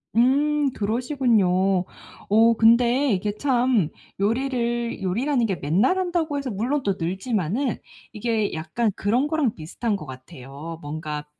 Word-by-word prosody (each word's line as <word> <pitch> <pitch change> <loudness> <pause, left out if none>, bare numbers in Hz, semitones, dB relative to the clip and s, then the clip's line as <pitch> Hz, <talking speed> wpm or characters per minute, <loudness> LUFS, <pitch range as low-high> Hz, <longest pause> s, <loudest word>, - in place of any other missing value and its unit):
음. 260 +5 +4 0.3
그러시군요. 210 -6 +1 0.4
어 225 +2 +5
근데 240 +4 +4
이게 205 +2 -1
참 245 - +2 0.3
요리를 235 0 -1
요리라는 240 +7 +1
게 195 - -1
맨날 185 - +1
한다고 345 -5 -1
해서 280 -2 -3
물론 245 +8 -1
또 195 -2 0
늘지만은 195 - -1 0.4
이게 220 -1 -1
약간 205 +8 -1
그런 240 +8 +1
거랑 300 -7 0
비슷한 200 +7 -3
거 170 - -7
같아요. 135 +5 -9
뭔가 150 0 -5
225 Hz, 270 characters per minute, -24 LUFS, 185-255 Hz, 0.4 s, 어